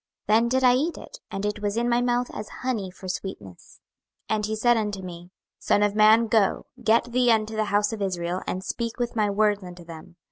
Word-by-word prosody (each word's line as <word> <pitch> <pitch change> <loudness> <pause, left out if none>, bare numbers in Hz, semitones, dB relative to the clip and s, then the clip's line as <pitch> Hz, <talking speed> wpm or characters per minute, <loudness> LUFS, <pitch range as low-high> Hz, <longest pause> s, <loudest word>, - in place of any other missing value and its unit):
Then 225 +3 +3
did 260 +1 +1
I 250 -1 +6
eat 300 +7 0
it; - - -11
and 195 +1 -4
it 210 0 -3
was 205 +1 -2
in 240 +1 +1
my 240 0 +2
mouth 245 0 0
as 210 - -6
honey 225 -7 -2
for 185 +1 -11
sweetness. 105 - -7 0.5
26:003:004 - - +3
And 210 -1 -1
he 220 - -2
said 240 +2 +3
unto 210 -3 -2
me, 175 -1 -9 0.3
Son 205 - +2
of 205 -1 +2
man, 215 +2 +5
go, 220 -3 +1 0.2
get 230 +2 +2
thee 250 0 +3
unto 220 -1 +2
the 215 0 0
house 205 +1 +1
of 215 - -6
Israel, 180 -2 -2
and 185 - -3
speak 230 +4 -4
with 240 -1 -2
my 210 -2 +2
words 205 0 +2
unto 180 -1 -10
them. 165 +1 -11
215 Hz, 225 wpm, -25 LUFS, 195-235 Hz, 0.5 s, I